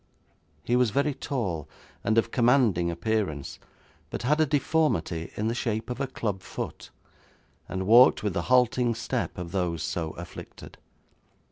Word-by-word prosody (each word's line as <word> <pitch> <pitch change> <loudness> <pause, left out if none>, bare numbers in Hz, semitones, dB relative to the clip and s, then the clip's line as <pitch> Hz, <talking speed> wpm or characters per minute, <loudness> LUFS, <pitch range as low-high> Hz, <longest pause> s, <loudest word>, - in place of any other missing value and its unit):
He 120 - +1
was 125 -2 +3
very 140 +6 +1
tall, 95 - -3 0.3
and 110 +1 +1
of 115 0 +2
commanding 120 -8 +3
appearance, 85 -5 -2 0.5
but - - -5
had 150 +5 +2
a 155 - +3
deformity 135 - 0
in 105 - -1
the 115 - 0
shape 115 -1 -2
of 125 - -4
a 140 - 0
club 105 -7 -3
foot, - - -6 0.8
and 95 0 -3
walked 120 +3 +7
with 105 -3 0
the 85 - 0
halting 125 -1 +3
step 110 - -3
of 90 -1 -6
those 90 -4 -1
so 80 -2 -3
afflicted. 85 0 -10
110 Hz, 150 wpm, -27 LUFS, 90-125 Hz, 0.8 s, walked